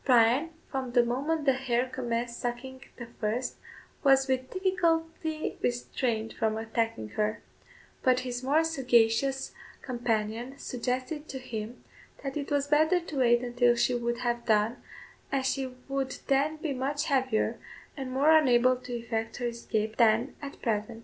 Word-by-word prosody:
Bryan, 250 Hz, +5 st, +4 dB, 0.2 s
from 260 Hz, -3 st, -3 dB
the 245 Hz, -1 st, +6 dB
moment 285 Hz, +6 st, -1 dB
the 270 Hz, -, +5 dB
hare 255 Hz, -1 st, 0 dB
commenced 240 Hz, -2 st, -3 dB
sucking 255 Hz, +2 st, -4 dB, 0.2 s
the 240 Hz, -, -6 dB
first, 235 Hz, +3 st, -1 dB, 0.5 s
was 270 Hz, -1 st, +5 dB
with 260 Hz, -1 st, 0 dB
difficulty 325 Hz, -4 st, -1 dB
restrained 235 Hz, -2 st, -1 dB
from 220 Hz, -1 st, 0 dB
attacking 225 Hz, -, -2 dB
her; 215 Hz, -, -1 dB, 0.6 s
but 255 Hz, -1 st, +3 dB
his 250 Hz, -1 st, -4 dB
more 290 Hz, +5 st, +3 dB
sagacious 265 Hz, -3 st, +2 dB, 0.3 s
companion 235 Hz, +1 st, -2 dB
suggested 255 Hz, +5 st, -3 dB
to 265 Hz, -, -4 dB
him, 230 Hz, -2 st, -6 dB, 0.4 s
that 275 Hz, -1 st, -4 dB
it 285 Hz, -2 st, -3 dB
was 285 Hz, -1 st, +1 dB
better 315 Hz, +5 st, +4 dB
to 325 Hz, -4 st, -7 dB
wait 240 Hz, -1 st, +4 dB
until 245 Hz, 0 st, +3 dB
she 245 Hz, +1 st, +2 dB
would 240 Hz, 0 st, -1 dB
have 240 Hz, -1 st, -1 dB
done, 215 Hz, +1 st, +3 dB, 0.5 s
as 270 Hz, -2 st, 0 dB
she 265 Hz, 0 st, 0 dB, 0.2 s
would 270 Hz, -1 st, -2 dB
then 285 Hz, +3 st, +2 dB
be 305 Hz, -2 st, -2 dB
much 280 Hz, +3 st, -1 dB
heavier, 260 Hz, -6 st, +1 dB, 0.4 s
and 270 Hz, -3 st, -5 dB
more 285 Hz, +5 st, +5 dB
unable 255 Hz, -4 st, +5 dB
to 250 Hz, 0 st, -8 dB
effect 225 Hz, -1 st, -3 dB
her 245 Hz, -, -3 dB
escape 220 Hz, -2 st, -3 dB
than 230 Hz, +3 st, +3 dB
at 280 Hz, -1 st, -8 dB
present. 225 Hz, 0 st, -1 dB
255 Hz, 150 wpm, -29 LUFS, 235-275 Hz, 0.6 s, the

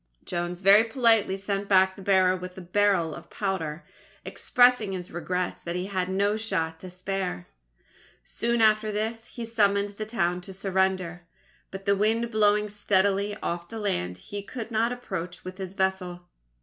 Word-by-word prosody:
Jones 175 Hz, 0 st, -3 dB
very 200 Hz, +3 st, +7 dB
politely 225 Hz, -5 st, +3 dB
sent 200 Hz, 0 st, -3 dB
back 190 Hz, -1 st, +5 dB
the -, -, -11 dB
bearer 185 Hz, -1 st, +4 dB
with 180 Hz, 0 st, -8 dB
a -, -, -6 dB
barrel 185 Hz, -3 st, +2 dB
of -, -, -11 dB
powder 170 Hz, -5 st, -3 dB, 0.4 s
expressing 245 Hz, -6 st, +3 dB
his 180 Hz, -1 st, -6 dB
regrets 180 Hz, +1 st, -3 dB
that 170 Hz, 0 st, -4 dB
he 180 Hz, +1 st, -2 dB
had 185 Hz, -2 st, -2 dB
no 200 Hz, +2 st, +1 dB
shot 165 Hz, -7 st, -2 dB
to 185 Hz, -, -9 dB
spare. 185 Hz, -, -4 dB, 0.8 s
Soon 235 Hz, 0 st, 0 dB
after 215 Hz, 0 st, +3 dB
this, 225 Hz, +2 st, -3 dB
he 235 Hz, -, -4 dB
summoned 205 Hz, -3 st, +2 dB
the 210 Hz, +1 st, -6 dB
town 180 Hz, -5 st, 0 dB
to 190 Hz, +1 st, -9 dB
surrender, 190 Hz, -2 st, -1 dB, 0.4 s
but 195 Hz, 0 st, -8 dB
the 200 Hz, -1 st, +4 dB
wind 225 Hz, +3 st, +1 dB
blowing 210 Hz, -1 st, +3 dB
steadily 200 Hz, 0 st, +1 dB
off 170 Hz, 0 st, -3 dB
the 225 Hz, -, -7 dB
land, 90 Hz, -, -2 dB
he 200 Hz, -, -7 dB
could 225 Hz, +3 st, -7 dB
not 225 Hz, +2 st, +1 dB
approach 180 Hz, -8 st, -5 dB
with 185 Hz, +1 st, -8 dB
his 190 Hz, 0 st, -6 dB
vessel. 190 Hz, -2 st, -1 dB
195 Hz, 165 wpm, -27 LUFS, 180-215 Hz, 0.8 s, very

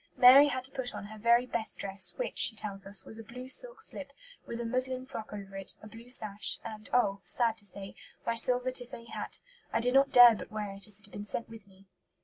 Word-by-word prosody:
Mary 270 Hz, +3 st, +9 dB
had 260 Hz, -3 st, -3 dB
to 265 Hz, -, -5 dB
put 260 Hz, -3 st, -5 dB
on -, -, -7 dB
her 215 Hz, +1 st, -11 dB
"very 235 Hz, +3 st, +4 dB
best 235 Hz, -3 st, -1 dB
dress, 195 Hz, -1 st, -1 dB
which," -, -, -3 dB
she 225 Hz, -, +4 dB
tells 200 Hz, -2 st, -7 dB
us, 200 Hz, 0 st, +3 dB
"was 220 Hz, -, -7 dB
a -, -, -8 dB
blue 250 Hz, +4 st, -10 dB
silk 485 Hz, -, +2 dB
slip, 285 Hz, -10 st, -4 dB, 0.4 s
with 235 Hz, -, -6 dB
a 235 Hz, -, -4 dB
muslin 255 Hz, +2 st, +1 dB
frock 220 Hz, -4 st, -8 dB
over 195 Hz, -2 st, -9 dB
it, 195 Hz, -1 st, -5 dB
a -, -, -9 dB
blue 230 Hz, +3 st, -13 dB
sash, 210 Hz, -4 st, 0 dB
and, 215 Hz, 0 st, -8 dB
oh! 200 Hz, -5 st, +1 dB
sad 225 Hz, +5 st, +2 dB
to 205 Hz, -, -9 dB
say, 195 Hz, 0 st, -8 dB, 0.3 s
my 230 Hz, -, 0 dB
silver 250 Hz, +2 st, +3 dB
tiffany 240 Hz, -2 st, -6 dB
hat. -, -, -6 dB, 0.3 s
I -, -, +1 dB
did 250 Hz, +2 st, +1 dB
not 275 Hz, +1 st, +5 dB
dare 245 Hz, -1 st, +9 dB
but 215 Hz, -, -8 dB
wear 210 Hz, -2 st, -4 dB
it, 195 Hz, +2 st, -9 dB
as 210 Hz, -2 st, -5 dB
it 210 Hz, -, -10 dB
had 205 Hz, -, -8 dB
been 205 Hz, -, -7 dB
sent 210 Hz, +3 st, -4 dB
with 225 Hz, -3 st, -13 dB
me." 195 Hz, 0 st, -21 dB
230 Hz, 245 wpm, -30 LUFS, 205-250 Hz, 0.4 s, Mary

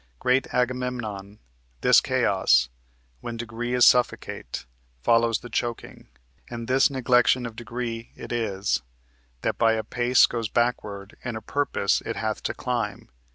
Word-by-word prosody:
Great 125 Hz, -, +1 dB
Agamemnon, 125 Hz, -5 st, -2 dB, 0.4 s
This -, -, +6 dB
chaos, -, -, +2 dB, 0.5 s
when 115 Hz, -, -6 dB
degree 120 Hz, +1 st, -3 dB
is 125 Hz, -, +6 dB
suffocate, 125 Hz, -1 st, +1 dB, 0.4 s
Follows 115 Hz, -1 st, +3 dB
the 120 Hz, -, -9 dB
choking; 120 Hz, 0 st, -4 dB, 0.4 s
And 115 Hz, -1 st, -6 dB
this 130 Hz, +1 st, +4 dB
neglection 125 Hz, -2 st, +2 dB
of 115 Hz, -2 st, -7 dB
degree 115 Hz, 0 st, -5 dB
it -, -, -9 dB
is, 105 Hz, -, -1 dB, 0.6 s
That -, -, -1 dB
by 115 Hz, -1 st, +4 dB
a 110 Hz, -1 st, -1 dB
pace 120 Hz, +3 st, +4 dB
goes 115 Hz, -3 st, -3 dB
backward, 105 Hz, -4 st, -2 dB
in 120 Hz, -2 st, -4 dB
a -, -, -3 dB
purpose 140 Hz, -7 st, 0 dB
It 115 Hz, -, -4 dB
hath 110 Hz, -1 st, -2 dB
to -, -, -2 dB
climb. 120 Hz, -5 st, -3 dB
120 Hz, 140 wpm, -25 LUFS, 110-125 Hz, 0.6 s, This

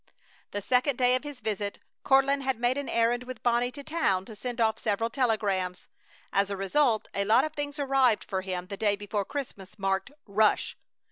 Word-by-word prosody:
The 205 Hz, 0 st, -5 dB
second 255 Hz, +4 st, +2 dB
day 250 Hz, 0 st, +3 dB
of 255 Hz, -, +1 dB
his 290 Hz, -4 st, -8 dB
visit 205 Hz, -2 st, -3 dB, 0.3 s
Courtland 275 Hz, +1 st, +4 dB
had 265 Hz, -3 st, -1 dB
made 245 Hz, +1 st, +2 dB
an 285 Hz, 0 st, -4 dB
errand 235 Hz, +1 st, +2 dB
with 250 Hz, -2 st, -8 dB
Bonnie 240 Hz, +1 st, +2 dB
to 285 Hz, -, -8 dB
town 200 Hz, -, 0 dB
to 220 Hz, -, -10 dB
send 245 Hz, +2 st, -5 dB
off 220 Hz, -1 st, +2 dB
several 225 Hz, +2 st, 0 dB
telegrams. 200 Hz, -8 st, 0 dB, 0.5 s
As 200 Hz, 0 st, +2 dB
a 200 Hz, -, -3 dB
result 220 Hz, +4 st, +2 dB
a 200 Hz, -, 0 dB
lot 215 Hz, +3 st, +4 dB
of 310 Hz, -, -3 dB
things 290 Hz, -1 st, -4 dB
arrived 270 Hz, -5 st, +3 dB
for 190 Hz, -1 st, -3 dB
him 185 Hz, -1 st, -4 dB
the 200 Hz, +1 st, -7 dB
day 205 Hz, -1 st, +2 dB
before 205 Hz, 0 st, -3 dB
Christmas, 215 Hz, -8 st, -6 dB
marked 195 Hz, +5 st, -1 dB
"Rush!" 210 Hz, +1 st, +2 dB
230 Hz, 195 wpm, -28 LUFS, 200-265 Hz, 0.5 s, Courtland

